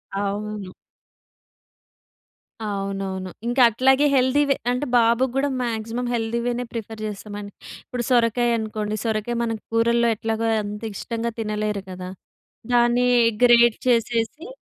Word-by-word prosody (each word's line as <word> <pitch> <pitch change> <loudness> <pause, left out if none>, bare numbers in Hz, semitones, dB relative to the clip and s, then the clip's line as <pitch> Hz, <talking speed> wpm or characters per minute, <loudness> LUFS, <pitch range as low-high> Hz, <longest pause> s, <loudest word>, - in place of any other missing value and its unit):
అవును. 205 0 -3 2.0
అవునవును. 195 -2 -3 0.2
ఇంకా 245 +2 +2
అట్లాగే 265 +5 +3
హెల్తీవె 275 +2 +3 0.2
అంటే, 250 +4 -1
బాబుకి 235 +2 +3
గూడా 275 +1 +1
మాక్సిమం 230 +1 -3
హెల్తీ 230 0 -1
వేనే 245 0 -1
ప్రిఫర్ 220 -1 -6
చేస్తామండి. 205 0 -7 0.3
ఇప్పుడు 245 -1 -4
సొరకాయ 240 -1 +3
అనుకోండి. 215 -1 -3
సొరకాయ 220 +1 -1
మన 230 - -1 0.2
కూరల్లో 235 +1 +3
ఎట్లాగో 225 +1 -2 0.2
అంత 210 +2 -6
ఇష్టంగా 230 +3 -3
తినలేరు 210 -2 -2
కదా, 185 0 -7 0.6
దాన్ని 240 +1 +4 0.4
గ్రేట్ 240 -1 +6
చేసేసి. 235 - 0
230 Hz, 110 wpm, -23 LUFS, 210-240 Hz, 2.0 s, గ్రేట్